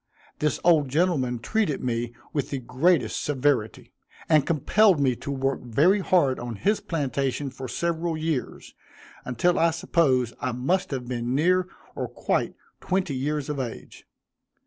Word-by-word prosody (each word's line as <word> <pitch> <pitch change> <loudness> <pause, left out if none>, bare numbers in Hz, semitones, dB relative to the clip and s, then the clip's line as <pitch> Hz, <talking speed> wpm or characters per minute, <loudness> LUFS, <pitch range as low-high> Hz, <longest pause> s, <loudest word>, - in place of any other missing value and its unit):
This 150 0 0
old 160 -5 +4
gentleman 140 -5 +1
treated 185 - -1
me 120 -1 -1 0.2
with 145 - -1
the 140 - -2
greatest 130 +6 +1
severity, 135 -6 -1 0.3
and 155 -3 +4
compelled 180 +4 +3
me 130 -3 +2
to 140 - -8
work 135 -1 -1
very 150 - +3
hard 170 -9 +2
on 120 -1 -5
his 205 - +1
plantation 140 -3 -2
for 130 0 -7
several 170 +3 -2
years, 155 -4 -3 0.5
until 150 +9 +1
I 165 - +4
suppose 140 -7 +1
I 130 - -2
must 170 +11 0
have 130 -3 -4
been 120 0 -2
near 180 +5 +2 0.3
or - - -3
quite - - -1 0.2
twenty 185 -4 -1
years 145 +2 -2
of 150 -2 -3
age. 120 -3 -7
145 Hz, 145 wpm, -25 LUFS, 130-170 Hz, 0.5 s, old